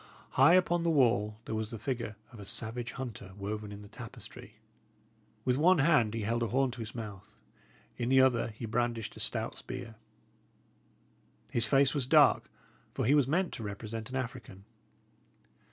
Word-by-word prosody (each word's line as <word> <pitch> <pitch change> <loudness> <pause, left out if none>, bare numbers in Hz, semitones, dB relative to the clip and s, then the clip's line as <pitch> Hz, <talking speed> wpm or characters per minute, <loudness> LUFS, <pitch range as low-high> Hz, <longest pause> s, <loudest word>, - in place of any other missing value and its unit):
High 140 +7 +6
upon 175 -2 +3
the 170 - +1
wall 115 -8 +2
there - - -4
was 110 -1 -2
the 115 - -6
figure 115 -2 -3 0.2
of 115 - -12
a - - -7
savage 115 +4 -2
hunter 110 -7 -7
woven 105 +1 -4
in 100 0 -9
the - - -11
tapestry. - - -9 0.9
With 125 0 +2
one 175 +5 +5
hand 120 -7 +3
he 115 - -2
held 115 +3 0
a 115 - +1
horn 130 +2 +1
to 120 - -10
his 115 0 -6
mouth; 105 -3 -8 0.6
in 120 - -1
the 130 0 +5
other 130 -3 +4
he 115 +1 -7
brandished 115 -1 -1
a - - -11
stout 110 +1 -2
spear. 125 -3 -7 1.6
His 115 -2 +3
face 135 +3 +4
was 140 -4 -1
dark, - - +5 0.5
for - - 0
he 135 - +4
was 145 -3 +4
meant 175 +5 0
to 115 - -6
represent 110 +3 -6
an 130 - -6
African. 120 -6 -6
115 Hz, 175 wpm, -31 LUFS, 110-130 Hz, 1.6 s, High